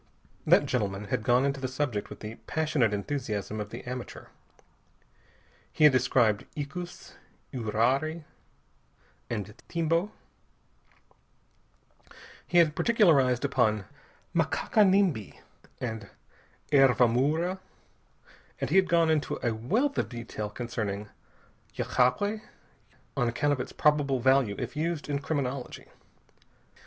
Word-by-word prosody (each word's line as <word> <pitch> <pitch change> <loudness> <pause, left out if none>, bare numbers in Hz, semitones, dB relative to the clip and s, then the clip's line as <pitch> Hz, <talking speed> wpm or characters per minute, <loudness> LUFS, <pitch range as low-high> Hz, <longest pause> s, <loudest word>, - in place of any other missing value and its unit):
That - - +6
gentleman 100 -4 -2
had - - +1
gone 125 +3 +3
into 140 0 -1
the 130 - -2
subject 130 -5 -2
with - - -10
the 105 +1 -6
passionate 155 -8 +1
enthusiasm 110 -2 -3
of 105 - -6
the 115 - -8
amateur. 125 -1 -7 1.4
He 155 - 0
had 150 -3 +8
described 120 -4 +2
icus, 175 +5 -6 0.4
uirari 130 +8 0 1.1
and 105 -3 -4
timbo. 170 +4 0 2.4
He 175 - +1
had 160 -3 +5
particularized 145 - +3
upon 110 -7 +1 0.5
makaka 215 - +2
nimbi 185 - +2 0.4
and 110 -4 -5 0.6
hervamoura. 140 +6 +3 1.0
And - - -3
he - - +4
had 190 -2 +4
gone 165 -2 +4
into 155 -2 0
a 120 - +1
wealth 220 - 0
of - - -1
detail 115 -3 -5
concerning 105 -3 -4 0.7
yagué, 205 - +1 0.7
on 125 -4 +1
account 145 +5 +1
of 135 - -3
its 125 - -4
probable 145 -3 +2
value 130 -4 +3
if 125 +2 -5
used 160 0 -2
in 145 -1 -1
criminology. 140 -3 -4
130 Hz, 110 wpm, -28 LUFS, 115-155 Hz, 2.4 s, had